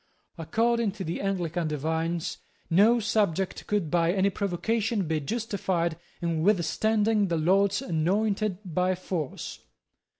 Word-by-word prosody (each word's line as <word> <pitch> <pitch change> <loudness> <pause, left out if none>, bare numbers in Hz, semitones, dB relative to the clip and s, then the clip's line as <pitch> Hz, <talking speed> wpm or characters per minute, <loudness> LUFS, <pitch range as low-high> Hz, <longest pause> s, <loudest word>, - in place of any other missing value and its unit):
According 225 +5 +1
to 195 - -6
the 165 0 -3
Anglican 175 -4 -1
divines, 160 +3 -2 0.3
no 215 +8 +5
subject 200 -4 0
could 205 -7 0
by 170 -1 +3
any 195 +1 +2
provocation 200 +2 -1
be 160 -1 0
justified 190 -3 -1 0.3
in 165 -2 0
withstanding 210 +3 +2
the 170 -2 0
Lord's 195 +7 +2
anointed 195 +2 0
by 180 +2 0
force. 175 -5 -5
185 Hz, 120 wpm, -27 LUFS, 165-210 Hz, 0.3 s, no